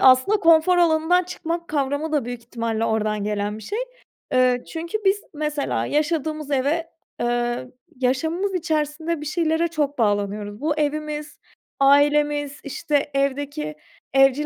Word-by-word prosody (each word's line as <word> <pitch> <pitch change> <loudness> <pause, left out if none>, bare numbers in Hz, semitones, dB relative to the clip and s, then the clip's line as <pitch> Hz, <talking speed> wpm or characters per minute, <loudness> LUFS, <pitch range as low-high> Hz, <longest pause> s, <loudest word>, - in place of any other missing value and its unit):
aslında 260 +11 +6
konfor 335 +1 +5
alanından 345 +1 +3
çıkmak 340 -1 -4
kavramı 285 +1 -1
da 295 -5 +1
büyük 245 0 -5
ihtimalle 230 -1 -2
oradan 215 -2 0
gelen 210 0 -2
bir - - -11
şey. 415 - -4 0.6
Eee, 255 -1 +3
çünkü 335 +5 -3
biz 395 +2 +3
mesela 300 -1 -1
yaşadığımız 305 -1 -1
eve 295 +5 0 0.3
eee, 240 +1 0 0.3
yaşamımız 320 +10 0
içerisinde 315 -1 -1
bir - - -6
şeylere 320 +1 +1
çok 295 -3 -1
bağlanıyoruz. 205 0 0
Bu 305 0 +1
evimiz, 300 0 -2 0.4
ailemiz, 290 +1 +3
işte, 290 +1 -1
evdeki 275 - -1 0.4
evcil 270 +2 +4
290 Hz, 130 wpm, -23 LUFS, 250-320 Hz, 0.6 s, aslında